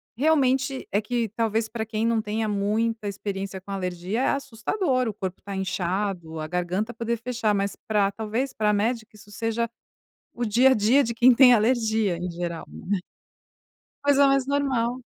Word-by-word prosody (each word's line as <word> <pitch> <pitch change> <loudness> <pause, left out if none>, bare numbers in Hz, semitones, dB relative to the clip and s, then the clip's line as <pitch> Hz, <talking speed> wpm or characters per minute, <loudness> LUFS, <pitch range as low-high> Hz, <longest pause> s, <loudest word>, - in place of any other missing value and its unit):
Realmente 265 -1 +1
é 205 - +2
que 230 +1 -1
talvez 225 +1 0
para 220 0 -4
quem 220 0 -2
não 230 -1 +2
tenha 215 +1 -2
muita 215 +2 0
experiência 195 -1 -4
com 195 +2 -11
alergia 185 +4 -2
é - - +2
assustador, 260 - -1
o 220 - -2
corpo 190 -2 -5
está 200 0 -6
inchado, 185 -3 -2
a 155 - -3
garganta 180 +6 -2
poder 230 +1 -2
fechar, 230 -2 -1
mas 200 0 -1
para 205 -2 +2
talvez 225 +6 -3
para 210 -1 +1
médica 220 +2 -1
isso 210 0 -16
seja 230 +2 -1 0.7
o 240 - -2
dia 240 +5 +5
a - - +6
dia 245 +6 +4
de 235 0 -2
quem 245 +2 +6
tem 250 -1 +8
alergia 220 -4 +2
em 175 0 -4
geral, 170 -1 -4
né. 200 +1 -3 1.1
Coisa 285 0 +5
mais 275 -1 +2
normal, 265 -4 0
220 Hz, 170 wpm, -25 LUFS, 200-240 Hz, 1.1 s, tem